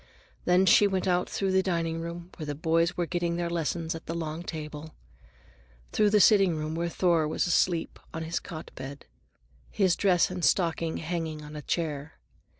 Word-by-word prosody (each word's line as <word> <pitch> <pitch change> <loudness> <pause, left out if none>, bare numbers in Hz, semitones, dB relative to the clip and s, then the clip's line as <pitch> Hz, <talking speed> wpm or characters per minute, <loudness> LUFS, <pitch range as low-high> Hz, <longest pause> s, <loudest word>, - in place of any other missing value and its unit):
Then 180 +2 +4
she 205 +2 +6
went 190 -1 -1
out 180 0 +1
through 195 -1 -1
the 190 0 +4
diningroom, 170 -1 -3
where 155 - -7
the 145 - -3
boys 165 +3 +1
were 175 - +1
getting 175 0 -1
their 170 0 -2
lessons 165 0 -1
at 165 - -9
the 165 - -3
long 160 -1 -4
table; 155 -2 -7 1.0
through 210 -1 +3
the 210 0 +4
sitting 195 -5 +5
room, 155 0 -3
where 170 +1 -1
Thor 170 -3 +2
was 155 - 0
asleep 175 -1 +1
in 160 - -4
his 165 +1 -2
cot 160 -2 -9
bed, 140 +1 -8 0.6
his 190 -4 +2
dress 180 -3 +3
and 180 -1 -5
stocking 165 -2 +1
hanging 160 -2 -4
on 150 +1 -10
a 150 - -5
chair. 150 -2 -3
170 Hz, 180 wpm, -28 LUFS, 160-180 Hz, 1.0 s, she